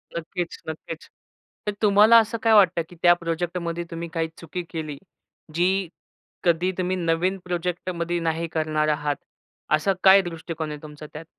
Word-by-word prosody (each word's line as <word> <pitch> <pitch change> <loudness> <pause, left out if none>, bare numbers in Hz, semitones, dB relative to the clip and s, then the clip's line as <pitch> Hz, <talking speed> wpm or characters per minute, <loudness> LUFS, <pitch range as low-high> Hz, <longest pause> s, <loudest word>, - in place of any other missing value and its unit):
नक्कीच, 170 +1 -4
नक्कीच. 160 0 -7 0.6
तर 210 - 0
तुम्हाला 210 +2 +7
असं 225 +1 +1
काय 225 - +4
वाटतं, 185 -4 +5
की 175 - -14
त्या 175 0 +7
प्रोजेक्टमध्ये 170 0 -3
तुम्ही 170 0 -5
काही 165 -1 0
चुकी 175 +2 -5
केली, 155 -3 -5 0.6
जी 185 +2 +1 0.6
कधी 175 +1 +2
तुम्ही 185 0 0
नवीन 175 +2 0
प्रोजेक्टमध्ये 175 -1 -2
नाही 165 0 -1
करणार 155 -1 0
आहात, 150 -1 0 0.6
असा 155 +6 +3
काय 195 +1 +8
दृष्टिकोन 165 -2 -5
आहे 150 -1 -7
तुमचा 150 0 -10
त्यात? 150 +2 -8
170 Hz, 150 wpm, -24 LUFS, 160-180 Hz, 0.6 s, काय